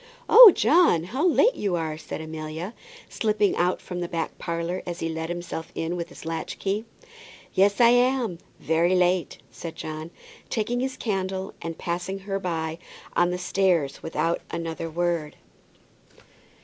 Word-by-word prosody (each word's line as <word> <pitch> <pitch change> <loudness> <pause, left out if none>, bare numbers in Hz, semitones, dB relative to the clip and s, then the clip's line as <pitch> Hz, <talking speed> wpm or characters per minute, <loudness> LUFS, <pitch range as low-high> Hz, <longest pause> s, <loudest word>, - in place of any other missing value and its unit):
"Oh, 450 -1 +11
John, 320 - +4
how 260 - 0
late 445 +8 +4
you 200 - -1
are!" 160 -2 -2
said 160 0 -7
Amelia, 160 +4 -6 0.3
slipping 210 -2 +1
out 180 +1 +1
from 180 -1 -6
the 175 - -2
back 165 -1 -3
parlour 170 +2 -3
as 175 -1 -6
he 165 - -2
let 160 0 -4
himself 175 -2 -5
in 165 +2 -2
with 170 -1 -4
his - - -12
latch 165 0 -4
key. 205 +3 -2 0.7
"Yes, 200 +1 +3
I 235 -1 +7
am; 245 -6 +2 0.2
very 170 +3 +2
late," 180 -2 +1
said 160 +8 -8
John, 155 0 -6 0.4
taking 235 +2 -1
his 260 0 -2
candle, 190 -3 -3
and 165 -1 -5
passing 180 +3 -3
her 195 0 -4
by 165 -3 -3 0.4
on 175 0 +3
the 180 - -2
stairs 180 -6 +1
without 165 +1 -1
another 165 -1 -4
word. 170 -2 -1
175 Hz, 155 wpm, -25 LUFS, 165-195 Hz, 0.7 s, Oh